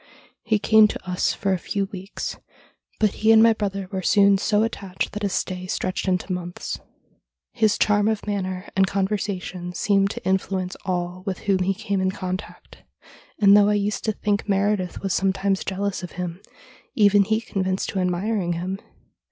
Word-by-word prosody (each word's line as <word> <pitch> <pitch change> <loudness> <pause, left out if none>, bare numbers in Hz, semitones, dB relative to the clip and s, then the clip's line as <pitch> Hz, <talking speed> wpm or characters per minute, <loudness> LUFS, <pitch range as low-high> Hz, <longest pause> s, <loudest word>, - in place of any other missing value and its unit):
He 220 -1 +1
came 220 +1 +6
to 190 - -7
us 180 0 +1
for 195 -1 -1
a 185 - -1
few 200 +3 -2
weeks, 195 0 -6 0.6
but 215 -2 +3
he 220 +1 +5
and 220 0 +7
my 230 0 +6
brother 195 -3 -3
were 190 -1 -2
soon 200 +1 +4
so 210 +2 +2
attached 200 -4 -3
that 210 - -6
his 200 -2 -1
stay 185 0 -3
stretched 185 +1 -2
into 185 0 0
months. 175 -1 -5 0.7
His 215 -2 +2
charm 205 0 +3
of 220 -1 -1
manner 190 -2 -3
and 190 0 +4
conversa 195 0 -1
tion 180 -1 -7
seemed 195 +2 +2
to - - -7
influence 190 -1 -1
all 180 -1 -2
with 190 -2 -3
whom 195 -2 +1
he 190 +1 +1
came 200 0 -2
in 185 - +2
contact, 185 0 -6 0.6
and, 200 -1 +6
though 205 0 +6
I 210 - +3
used 205 0 -1
to 220 - +2
think 205 0 -2
Meredith 200 -2 0
was 195 - 0
sometimes 195 0 +1
jealous 200 +1 -2
of 180 - -8
him, 180 0 -5 0.5
even 205 -2 +5
he 220 +2 +1
confessed 190 -4 -2
to 195 - -2
admiring 180 +1 0
him. 185 +3 -4
195 Hz, 180 wpm, -23 LUFS, 185-205 Hz, 0.7 s, and